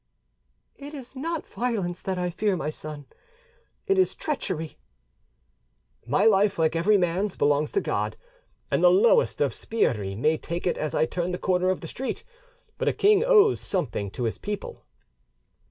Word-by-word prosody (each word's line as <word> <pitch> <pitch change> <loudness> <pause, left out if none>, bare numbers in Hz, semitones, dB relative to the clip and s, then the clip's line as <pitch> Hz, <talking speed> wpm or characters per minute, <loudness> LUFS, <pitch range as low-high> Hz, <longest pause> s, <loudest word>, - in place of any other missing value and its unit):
"It 290 +2 -9
is 265 -1 -10
not 320 +4 -3
violence 200 -8 -3
that 190 -1 -3
I 180 0 -1
fear, 200 +1 0
my 155 - -3
son, 150 -2 -8 0.8
it 390 -2 +2
is 375 - +2
treachery." 185 - -4 1.3
"My 150 - +2
life, 205 -2 +4
like 160 0 +1
every 200 +6 +4
man's, 180 +2 0
belongs 145 +1 +1
to 400 - +2
God, - - -2 0.5
and - - +1
the - - +8
lowest 475 +4 +4
of - - +2
sbirri 105 - -1
may 155 +8 +1
take 170 +1 -5
it 180 - 0
as 155 -1 -2
I - - +3
turn 175 +2 -3
the - - -1
corner 185 0 +1
of 185 - -1
the 165 - -7
street; 265 +10 -5 0.6
but - - -1
a - - +3
king 410 +1 +4
owes 435 -4 +5
something 120 - -2
to 120 - -5
his 115 - -2
people." 205 -1 -6
185 Hz, 170 wpm, -26 LUFS, 160-265 Hz, 1.3 s, the